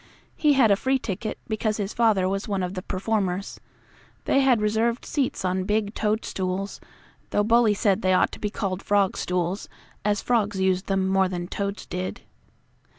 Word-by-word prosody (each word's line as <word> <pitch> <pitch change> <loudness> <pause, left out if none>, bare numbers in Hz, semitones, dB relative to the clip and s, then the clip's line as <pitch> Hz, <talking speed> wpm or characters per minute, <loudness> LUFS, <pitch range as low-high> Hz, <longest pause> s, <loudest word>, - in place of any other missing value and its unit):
He 300 -2 +3
had 250 -6 +5
a - - +6
free 265 +6 +1
ticket, 215 -2 -4
because 215 -1 -1
his 205 -1 -3
father 215 -5 +3
was 195 +3 -2
one 195 -3 -1
of 180 +1 -3
the 185 - -4
performers. 195 -1 -2 0.7
They - - +3
had 265 -4 +4
reserved 220 +3 0
seats 270 -9 -1
on 185 0 0
big 210 0 0
toadstools, 195 -3 -2 0.5
though 205 - +2
Bully 225 -1 +4
said 200 0 +2
they 185 0 +2
ought 185 - +3
to - - -9
be 210 - -2
called 195 -3 -3
frogstools, 190 -2 0 0.4
as 205 0 +1
frogs 220 -5 0
used 190 0 +1
them 190 -1 +1
more 190 -1 +3
than 175 -1 -4
toads 200 +1 -4
did. 185 +1 -4
200 Hz, 170 wpm, -25 LUFS, 190-220 Hz, 0.7 s, a